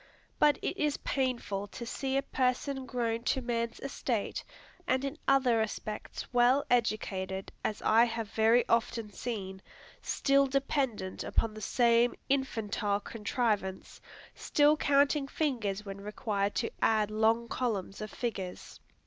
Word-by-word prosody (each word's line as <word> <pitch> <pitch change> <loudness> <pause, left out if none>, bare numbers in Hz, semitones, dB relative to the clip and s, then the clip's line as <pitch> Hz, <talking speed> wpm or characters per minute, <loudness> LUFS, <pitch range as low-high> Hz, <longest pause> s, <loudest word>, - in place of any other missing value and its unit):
But 295 -1 +5
it 370 - -2
is 300 -1 +1
painful 240 -7 -2
to 235 +4 -8
see 265 +3 -2
a 275 - +1
person 265 0 -1
grown 230 -2 -1
to 265 - +2
man's 235 -2 -2
estate, 245 -5 -2 0.4
and 260 +1 +1
in 275 +2 -3
other 260 -4 +4
respects 215 -1 -4
well 245 +3 +4
educated, 195 -5 0
as 210 - -2
I 225 +2 +6
have 230 -2 -4
very 225 +2 +4
often 230 -2 0
seen, 195 -4 -5 0.4
still 275 0 +2
dependent 265 -8 -1
upon 225 -1 0
the 215 - -9
same 235 +2 +3
infantile 220 -6 0
contrivance, 210 -3 -2 0.3
still 295 +1 +3
counting 285 -1 +3
fingers 225 -10 -1
when 195 0 -7
required 205 -1 -2
to 230 - -1
add 215 -1 +3
long 225 +2 +2
columns 215 -6 -2
of 215 - -4
figures. 195 -7 -5
230 Hz, 130 wpm, -31 LUFS, 210-265 Hz, 0.4 s, I